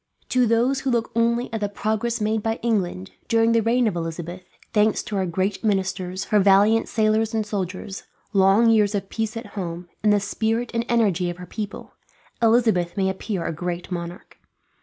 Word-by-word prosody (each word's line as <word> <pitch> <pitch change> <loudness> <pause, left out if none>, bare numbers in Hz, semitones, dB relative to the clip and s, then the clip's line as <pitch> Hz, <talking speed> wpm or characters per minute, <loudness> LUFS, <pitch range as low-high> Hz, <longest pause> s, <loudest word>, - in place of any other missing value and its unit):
To 250 -1 +3
those 240 +4 +2
who 270 - -2
look 235 -2 0
only 235 +1 +1
at 225 - -1
the 205 - 0
progress 220 +3 -1
made 215 +1 0
by 225 +1 -1
England, 185 - -1 0.2
during 225 0 +3
the 230 0 +3
reign 235 +2 +2
of 205 - -1
Elizabeth 170 +2 -5 0.3
thanks 210 0 +2
to 210 - -5
her 190 -1 0
great 190 +5 -1
ministers, 190 -2 -1
her 210 - +6
valiant 200 +3 +4
sailors 220 0 +1
and 220 -1 0
soldiers, 195 -1 -5 0.3
long 200 +4 +5
years 210 -2 +3
of 195 -1 -3
peace 220 0 -3
at 230 - -6
home, 175 -3 -5
and 210 - +3
the 205 - +4
spirit 225 +4 -1
and 230 0 -1
energy 200 -7 +2
of 175 - -5
her 180 - -8
people 210 +3 -7 0.5
Elizabeth 220 -7 +3
may 190 -1 +2
appear 190 -2 -4
a - - -2
great 175 +3 -4
monarch. 175 +2 -7
210 Hz, 185 wpm, -23 LUFS, 185-225 Hz, 0.5 s, her